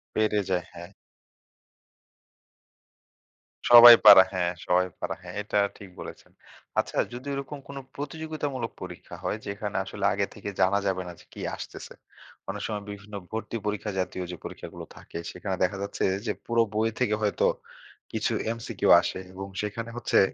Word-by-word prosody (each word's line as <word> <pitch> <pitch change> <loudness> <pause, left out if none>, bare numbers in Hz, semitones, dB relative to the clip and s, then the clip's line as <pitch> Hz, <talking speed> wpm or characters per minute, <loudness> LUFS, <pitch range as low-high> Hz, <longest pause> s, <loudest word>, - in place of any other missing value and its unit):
পেরে 110 -1 +2
যায়, 90 -1 0
হ্যাঁ। 85 0 -9 2.8
সবাই 120 0 +12
পারা, 95 - +12
হ্যাঁ 90 -1 0
সবাই 90 +1 +3 0.2
পারা, - - -2
হ্যাঁ - - -9
এটা 105 0 -2 0.2
ঠিক 100 -2 -11
বলেছেন। - - -10 0.5
আচ্ছা - - -2 0.2
যদি 125 +3 -8
ওইরকম 140 +1 -5
কোন 140 0 -8 0.2
প্রতিযোগিতামূলক 145 -4 -4
পরীক্ষা 90 -1 -8
হয়। - - -1
যেখানে 100 +1 -4
আসলে 100 0 -4
আগে 100 0 0
থেকে 100 -1 -6
জানা 100 +2 +4
যাবে 95 -1 0
না - - -6
যে - - -17
কি - - -8
আসতেছে। - - -9 0.6
অনেক 100 +1 -4
সময় 105 -2 -4
বিভিন্ন 100 +1 -10 0.2
ভর্তি 115 +1 -4
পরীক্ষা 105 0 -2
জাতীয় 90 0 -2
যে 90 - -7
পরীক্ষাগুলো - - -8
থাকে। - - -9
সেখানে 95 +1 -4
দেখা 95 +2 0
যাচ্ছে 100 - -3 0.2
যে, 105 - 0
পুরো 115 0 +2
বই 110 +1 +2
থেকে 105 -4 +2
হয়তো 105 -1 +1 0.7
কিছু - - 0 0.2
এমসিকিউ 115 0 -2
আসে - - -3
এবং 95 +1 -6
সেখানে 115 +3 -4
হচ্ছে 120 - +2
105 Hz, 155 wpm, -27 LUFS, 95-115 Hz, 2.8 s, সবাই